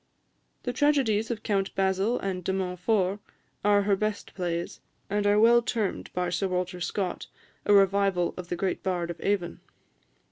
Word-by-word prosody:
The 245 - -2
tragedies 250 -8 +2
of 230 -3 -4
"Count 195 -2 -1
Basil" 195 +5 +1
and 185 -2 -3
"De 190 - -1
Montfort" 190 +1 0 0.4
are 205 -1 +4
her 200 0 +3
best 215 +1 -3
plays, 175 -2 -3 0.3
and 205 0 +1
are 205 +1 +4
well 235 +2 +6
termed 225 -4 -2
by 180 -1 -1
Sir 195 +3 0
Walter 180 0 -2
Scott 180 +1 -3 0.4
a 205 - +5
revival 195 -2 +3
of 180 -1 -7
the - - -1
great 185 +1 -2
Bard 175 -2 -1
of 170 - -10
Avon. 195 -4 -1
195 Hz, 165 wpm, -27 LUFS, 180-210 Hz, 0.4 s, well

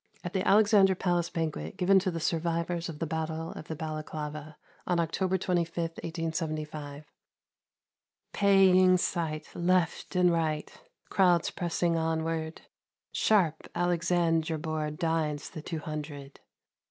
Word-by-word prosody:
(Al 175 - -4
the 190 -1 -1
Alexandra 205 -2 +5
Palace 175 -2 0
Banquet, 165 +2 -3
given 190 0 +5
to 190 0 -1
the 165 -2 -3
survivors 170 +1 -1
of 160 - -7
the 165 - -2
Battle 160 +1 -3
of 155 - -9
Balaclava, 155 -1 -5 0.3
on 175 -1 +1
October 185 +3 0
25, 175 -2 -1 0.2
1875). 155 -3 -4 1.3
Paying 190 -2 +5
sight! 165 -4 -2
Left 180 0 0
and 180 -1 +4
right. 155 -2 -1 0.4
Crowds 180 -4 +3
pressing 170 -1 0
onward, 160 0 -2 0.3
— - - -65
Sharp 175 -8 +2
Alexandra 170 -2 +1
Board 155 -1 -3
Dines 160 -3 -1
the 155 - -7
Two 165 +1 -5
Hundred 150 -3 -7
165 Hz, 120 wpm, -29 LUFS, 155-180 Hz, 1.3 s, Alexandra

